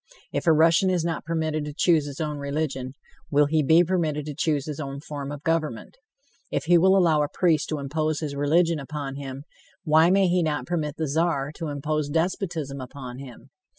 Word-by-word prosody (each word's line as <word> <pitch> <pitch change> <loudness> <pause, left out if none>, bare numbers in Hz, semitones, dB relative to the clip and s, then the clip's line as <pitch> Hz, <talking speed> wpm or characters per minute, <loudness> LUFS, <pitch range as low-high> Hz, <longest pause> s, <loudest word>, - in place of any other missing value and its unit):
If - - -2
a - - +7
Russian 165 +4 +4
is 175 -3 0
not 165 -2 -3
permitted 160 -2 -1
to 150 -1 -7
choose 160 -6 +3
his 140 -1 -8
own 150 -2 -2
religion, 140 -2 -3 0.4
will 145 0 +4
he 155 +2 +2
be 160 +4 +5
permitted 160 -5 -1
to 150 - -5
choose 150 -2 0
his 150 -1 -6
own 140 -2 -5
form 145 -1 -6
of 145 0 -8
government? 165 - -2 0.5
If - - -2
he 175 +2 +4
will 190 +3 +5
allow 165 -5 +4
a 145 - 0
priest 165 -4 +1
to 155 - -1
impose 155 +2 -1
his 150 -3 -4
religion 160 +3 +2
upon 140 -1 -5
him, 135 -1 -7 0.4
why 160 0 +5
may 195 0 +4
he 180 0 +2
not 155 -3 -1
permit 155 -4 -2
the 160 - -1
Czar 145 -2 0
to 160 +1 -6
impose 150 +1 -2
despotism 160 -4 -2
upon 130 -1 -8
him? 130 -1 -12
155 Hz, 200 wpm, -25 LUFS, 140-165 Hz, 0.5 s, a